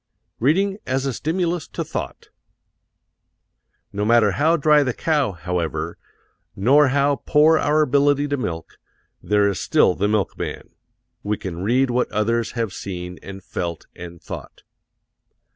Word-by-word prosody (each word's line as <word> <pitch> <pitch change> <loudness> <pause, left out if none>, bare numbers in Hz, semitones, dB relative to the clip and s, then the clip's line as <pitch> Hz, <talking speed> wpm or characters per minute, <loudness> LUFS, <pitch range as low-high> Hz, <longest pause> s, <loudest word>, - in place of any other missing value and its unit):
Reading 195 - +1
As 130 +1 -1
a 135 - -1
Stimulus 170 +4 -2
to - - -4
Thought - - -6 1.6
No 100 +1 -2
matter 110 -1 +4
how 160 - +2
dry 150 0 +4
the 130 -4 -1
cow, 150 -9 0
however, 85 -2 -3 0.6
nor 135 +9 +4
how 140 +1 +2
poor 155 +3 +4
our 155 +1 +3
ability 145 0 +2
to 145 - +1
milk, 85 - -5 0.4
there 105 +2 +2
is 100 -5 -1
still - - +3
the 100 +3 0
milkman 105 -2 -2 0.5
we 105 0 -2
can 90 -2 -6
read 125 +6 +2
what 125 +1 0
others 115 +1 0
have 115 -5 -2
seen 90 -2 -6
and 95 -1 -10
felt 85 -3 -5
and 85 -1 -10
thought. - - -9
120 Hz, 140 wpm, -22 LUFS, 95-145 Hz, 1.6 s, matter